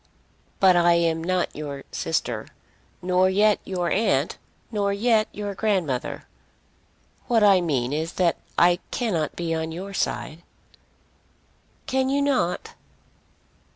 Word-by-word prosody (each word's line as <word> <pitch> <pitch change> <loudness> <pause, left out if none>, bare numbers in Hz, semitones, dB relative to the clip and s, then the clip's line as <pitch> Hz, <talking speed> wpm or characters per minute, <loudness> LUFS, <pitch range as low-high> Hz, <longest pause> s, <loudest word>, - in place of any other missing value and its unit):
"But 190 -2 +6
I 175 0 +5
am 165 -1 +1
not 185 +1 -1
your 145 -2 -6
sister, - - -2 0.6
nor 185 +1 +3
yet 205 +2 +3
your 180 -2 -2
aunt, 160 -9 +1 0.3
nor 200 -2 0
yet 220 +1 +2
your 205 -1 -5
grandmother. 185 - -1 1.0
What 230 -3 +3
I 195 -3 +6
mean 135 -6 -1
is 160 +3 -2
that 175 -2 +1 0.2
I 175 +1 +5
cannot 180 -11 -1
be 170 -1 -2
on 160 0 -2
your 190 +4 -7
side." 165 -3 -3 1.4
"Can 265 0 0
you 280 +1 +1
not?" 280 - 0
180 Hz, 120 wpm, -24 LUFS, 165-210 Hz, 1.4 s, But